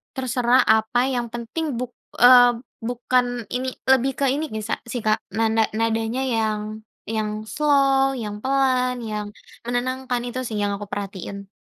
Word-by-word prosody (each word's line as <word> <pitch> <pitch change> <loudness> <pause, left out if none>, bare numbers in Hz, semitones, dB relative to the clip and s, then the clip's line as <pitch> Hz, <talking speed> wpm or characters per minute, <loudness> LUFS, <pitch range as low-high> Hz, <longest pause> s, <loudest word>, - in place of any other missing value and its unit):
Terserah 250 -1 +2
apa 220 +4 +2
yang 245 -2 -1
penting 245 +5 -3
buk 250 0 -4 0.3
eee, 245 0 +8 0.3
bukan 245 +1 0 0.3
ini, 255 +1 -2 0.2
lebih 265 0 +4
ke 280 - +2
ini 300 +3 -1
bisa 220 -1 -3
sih 245 0 -4
Kak 215 0 +3
nanda 225 0 +2
nadanya 225 +2 0
yang 215 -3 -2 0.2
yang 215 -1 -3
slow 275 -1 +3
yang 210 -4 -4
pelan 255 -2 +1
yang, 210 -2 -4 0.3
menenangkan 250 +1 -2
itu 245 +1 -4
sih 220 - -5
yang 205 0 0
aku 205 +1 -7
perhatiin. 200 0 -6
240 Hz, 145 wpm, -23 LUFS, 220-255 Hz, 0.3 s, eee